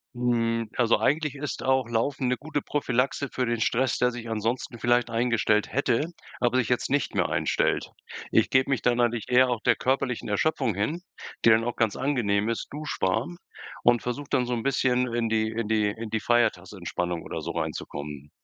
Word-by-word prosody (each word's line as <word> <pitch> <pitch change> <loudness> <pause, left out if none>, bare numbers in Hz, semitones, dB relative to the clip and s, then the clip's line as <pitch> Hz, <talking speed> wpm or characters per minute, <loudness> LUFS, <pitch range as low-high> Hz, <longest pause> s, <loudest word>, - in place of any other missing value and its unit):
Hm, 115 -2 0
also 120 -2 +3
eigentlich 150 0 +1
ist 145 0 -5
auch 130 -2 +2
laufen 125 +3 -1
'ne 125 - +2
gute 145 0 -3
Prophylaxe 140 -1 -1
für 130 - -1
den 120 -1 -1
Stress, 125 +4 +1
der 125 0 +2
sich 115 -1 -7
ansonsten 115 +2 -2
vielleicht 120 0 +2
eingestellt 115 -2 +1
hätte, 140 +4 0 0.3
aber 125 +1 +3
jetzt 125 +1 0
nicht 145 +1 0
mehr - - +1
einstellt. - - 0 0.4
Ich - - +3
gebe 130 +1 +3
mich 130 - +1
dann 120 0 +2
einentlich 120 -2 0
eher 130 +1 +5
auch 120 -3 -1
der - - +3
körperlichen 130 -3 -1
Erschöpfung 115 - 0
hin, 145 - -1 0.4
die - - +8
dann 110 0 +5
auch 120 +1 -3
ganz 110 -4 +1
angenehm 115 -6 0
ist, 115 - -3
duschwarm, 140 - -2 0.5
und 120 -1 +4
versuche 135 +4 -4
dann 125 -1 +2
so 125 - -2
'n 115 -2 -2
bisschen 125 -2 +2
in 115 -1 0
die 110 0 +1
in 110 -1 -3
die 110 -2 +2
in 110 +1 -6
die 110 - -1
Feiertagsentspannung 90 -6 -1
oder - - -5
so - - -4
reinzukommen. 75 0 -5
120 Hz, 185 wpm, -26 LUFS, 110-130 Hz, 0.5 s, die